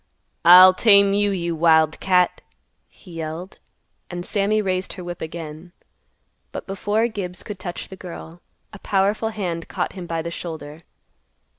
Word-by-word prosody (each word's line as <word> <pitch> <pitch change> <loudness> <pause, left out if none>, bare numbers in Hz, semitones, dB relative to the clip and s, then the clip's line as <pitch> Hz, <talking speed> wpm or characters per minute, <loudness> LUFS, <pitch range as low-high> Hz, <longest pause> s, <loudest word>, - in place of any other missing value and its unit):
"I'll 185 +2 +9
tame 200 0 +5
you, 205 0 +2
you 170 -3 -2
wild 160 -1 +3
cat," 180 -1 +2 0.5
he 180 - -17
yelled. 165 +3 -7 0.5
And 175 0 -6
Sammy 210 +1 +1
raised 185 -2 -2
her 185 - -9
whip 175 0 -7
again. 160 +1 -8 0.8
But - - -7
before 205 +3 0
Gibbs 190 -5 -6
could 205 -3 -8
touch 175 -2 -6
the 190 - -9
girl, 175 -2 -10 0.3
a 210 - -10
powerful 205 +3 0
hand 180 -6 -4
caught - - -3
him 180 -3 -8
by 165 -1 -3
the 170 - -5
shoulder. 160 -2 -8
180 Hz, 150 wpm, -22 LUFS, 165-200 Hz, 0.8 s, I'll